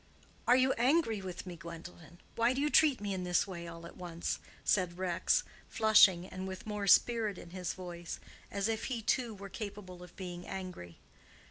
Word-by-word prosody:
"Are 245 - +7
you 260 +1 +4
angry 245 -5 +3
with 185 -1 -6
me, 180 -2 -6
Gwendolen? 170 0 -10 0.2
Why 235 +2 +3
do 265 - -2
you 295 +1 +1
treat 300 -5 +5
me 205 -1 -2
in 185 -1 -3
this 180 -1 +2
way 170 -3 -7
all 170 0 -9
at - - -11
once?" 170 -2 -3 0.3
said 180 -3 +2
Rex, 185 -1 +1 0.2
flushing, 205 -5 +6
and 185 0 -6
with 190 0 -7
more 210 -2 -3
spirit 220 0 +4
in 170 - -11
his 180 -1 -4
voice, 175 -2 -7 0.3
as 200 +1 -1
if 225 -1 -1
he 240 -4 -3
too 240 -1 0
were 200 0 -8
capable 195 -3 -7
of 180 0 -12
being 180 -2 -7
angry. 180 - -7
190 Hz, 190 wpm, -33 LUFS, 175-220 Hz, 0.3 s, Are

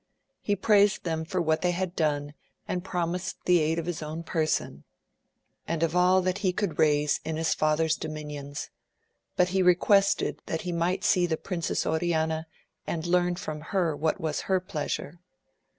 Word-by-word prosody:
He 205 - 0
praised 205 0 +3
them 160 -2 -2
for 185 +3 -2
what 160 -2 +1
they 180 - +2
had 185 0 -3
done 145 -2 0 0.3
and 180 -1 -2
promised 180 -1 -2
the 180 -1 +5
aid 160 +1 +1
of 165 - -2
his 175 -2 -3
own 155 +2 -5
person, 155 - -1 0.8
and 165 0 -1
of 165 +1 0
all 180 +1 +4
that 185 +2 0
he 190 -3 +1
could 195 -1 -3
raise 150 -1 +3
in 160 - -3
his 160 0 +1
father's 155 +1 +2
dominions, 150 -2 -6 0.6
but 180 0 +3
he 190 +1 +1
requested 195 +3 +3
that 160 - -2
he 180 - -4
might 170 +2 0
see 190 -4 +3
the 160 -2 -1
Princess 170 -2 -2
On 160 - +1
ana, 160 -1 0 0.4
and 165 -1 -3
learn 175 0 +2
from 155 -4 -5
her 170 -1 0
what 155 +2 0
was 155 -2 -2
her 190 -1 +4
pleasure. 170 -2 -4
170 Hz, 175 wpm, -27 LUFS, 155-180 Hz, 0.8 s, the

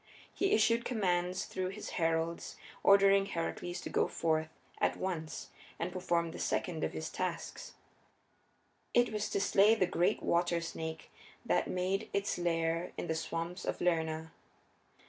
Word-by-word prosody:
He 390 - +1
issued 230 +2 +4
commands 185 -5 0
through 185 -1 -3
his 195 +3 -6
heralds 165 +1 0 0.3
ordering 195 0 +6
Heracles 175 0 -3
to - - -5
go - - +2
forth 160 -1 0 0.3
at - - +1
once 165 -4 -4 0.3
and 170 +2 -2
perform 170 -2 0
the - - -8
second 165 -3 -1
of - - -1
his 160 - -4
tasks. 185 -2 -4 1.2
It 240 -2 +4
was 210 -1 -1
to - - 0
slay 200 +2 +5
the 190 - +3
great 175 0 +1
water 170 0 +2
snake 160 -1 -6 0.3
that - - +2
made 190 +4 -1
its 200 -2 0
lair 165 0 0
in - - -3
the 160 - 0
swamps 165 +2 -3
of - - -2
Lerna. 160 -2 0
175 Hz, 145 wpm, -33 LUFS, 165-195 Hz, 1.2 s, ordering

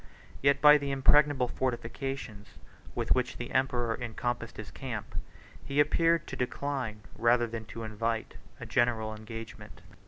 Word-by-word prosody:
Yet 140 0 +3
by 150 0 +8
the 140 -1 -3
impregnable 135 -1 +4
fortifications 120 -3 -4 0.4
with - - +2
which 125 -1 -1
the 120 - -6
emperor 120 -3 +1
encompassed 120 0 -3
his 110 -2 -7
camp, 115 -6 -6 0.5
he 140 +1 -1
appeared 165 +2 +3
to - - -6
decline, 125 -4 -3
rather 120 +1 +3
than 115 -1 -6
to 115 +2 -7
invite, 110 +1 -2 0.2
a - - -6
general 110 -3 +1
engagement. 115 +1 -9
120 Hz, 135 wpm, -30 LUFS, 115-135 Hz, 0.5 s, by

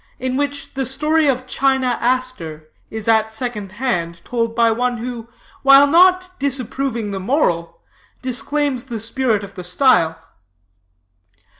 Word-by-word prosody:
IN 255 0 -3
WHICH 285 +1 -3
THE 270 -2 -2
STORY 300 +3 +1
OF 255 -2 0
CHINA 260 -1 0
ASTER 230 -12 -2 0.2
IS 220 -1 -5
AT 220 -1 +2
SECOND 220 -5 -4
HAND 175 -8 -3
TOLD 230 -2 -2
BY 230 -1 +3
ONE 245 +2 -1
WHO, 235 0 -6 0.3
WHILE 275 +1 +7
NOT 365 +4 +3
DISAPPROVING 260 -4 -1
THE 195 - -4
MORAL, 185 - 0 0.5
DISCLAIMS 265 +1 -1
THE 235 -4 -5
SPIRIT 225 -1 0
OF 200 - -10
THE 180 - -8
STYLE. 180 - +3
250 Hz, 135 wpm, -19 LUFS, 220-275 Hz, 0.5 s, WHILE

